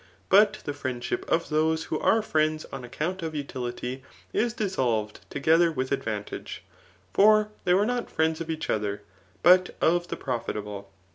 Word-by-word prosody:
But 205 +2 +6
the 145 - -2
friendship 130 -4 -4
of 165 - +1
those 160 +1 +1
who 155 - -3
are 225 0 +3
friends 155 -4 0
on 135 -2 -5
account 165 +9 -3
of 160 -1 -4
utility, 130 -2 -4 0.3
is 235 +1 +1
dissolved 125 - -1
together 165 +4 +3
with 130 -3 -3
advantage; 110 -6 -4 0.5
for 215 +1 +5 0.2
they 180 - +4
were 200 +2 +3
not 245 +1 -2
friends 160 0 0
of 165 - -5
each 160 -1 -3
other, 105 -1 -1 0.4
but 180 +1 +6
of 175 +1 +2
the - - -4
profitable. 105 -5 -4
155 Hz, 155 wpm, -27 LUFS, 125-180 Hz, 0.5 s, But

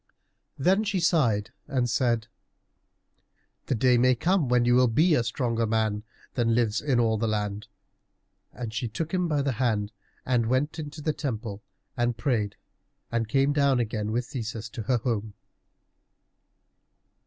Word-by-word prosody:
Then 190 +9 +3
she 205 -3 0
sighed 125 - +2 0.2
and 130 -4 0
said, 115 -2 +1 1.4
"The - - +1
day 125 +1 +4
may 130 +1 +4
come 170 +1 +1
when 125 -1 +3
you 120 - +4
will 125 0 +5
be 155 +9 +3
a 120 - +3
stronger 115 -1 -1
man 110 -1 0 0.3
than 115 -2 +1
lives 115 -2 +1
in 135 -5 +1
all 110 -2 +2
the 115 - 0
land." 105 -1 -2 0.8
And 115 -2 -6
she 115 +1 -2
took 150 - -4
him 180 -1 +1
by 150 -3 +1
the 140 - +1
hand 105 -4 +1 0.3
and 120 -3 +1
went 135 +6 0
into 150 0 -7
the 155 - +1
temple 110 -8 -4 0.3
and 120 -2 0
prayed, 110 -5 0 0.6
and 115 -2 -1
came 135 +3 +3
down 140 -3 +3
again 110 -2 -2
with 120 +2 -1
Theseus 115 -3 -5
to 110 - -6
her 120 +4 +1
home. 110 -3 -2
120 Hz, 155 wpm, -27 LUFS, 110-140 Hz, 1.4 s, will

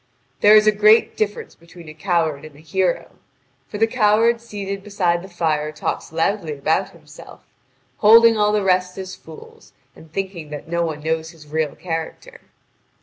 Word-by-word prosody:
There 210 +1 +6
is 215 0 +6
a 215 - +6
great 215 +2 +4
difference 210 -1 -3
between 170 0 -16
a 155 - -9
coward 160 -3 -1
and 155 -2 -12
a - - -16
hero; 180 +4 -2 0.5
for 210 - -7
the 225 - +3
coward 225 0 +2
seated 200 -3 -6
beside 180 -4 0
the 190 - -10
fire 155 -4 -1
talks 155 - -4
loudly 165 0 -1
about 160 +7 0
himself, - - -15 0.5
holding 230 +2 +6
all 210 -1 +2
the 210 -1 0
rest 185 -1 +1
as 185 -1 -7
fools, 160 -1 -15 0.2
and 160 - -17
thinking 185 -4 -5
that 150 0 -8
no 170 +1 -1
one 155 -3 -4
knows 160 0 -2
his 160 -3 -16
real 155 -1 -2
character. 180 - -6
180 Hz, 170 wpm, -20 LUFS, 160-210 Hz, 0.5 s, There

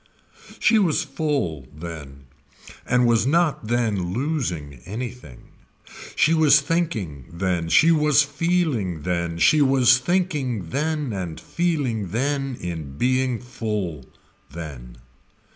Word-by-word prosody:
She 225 - +4
was 180 -3 +2
full 135 - -2
then 75 -3 -9 0.6
and 125 0 +3
was 115 -1 +3
not 160 -6 +1
then 105 -7 0
losing 95 - -3
anything. 115 - -7 0.7
She 160 - +3
was 155 -2 +6
thinking 130 - -2
then, 85 -1 -1
she 165 - +5
was 150 -2 +4
feeling 145 - -1
then, 85 -1 -2
she 150 - +4
was 130 -2 +5
thinking 135 - -1
then 150 -3 -1
and 90 -5 -5
feeling 145 - -1
then 135 +4 -1
in 80 -6 -6
being 130 - +1
full 105 - -4 0.5
then. 70 -7 -9
120 Hz, 110 wpm, -23 LUFS, -, 0.7 s, was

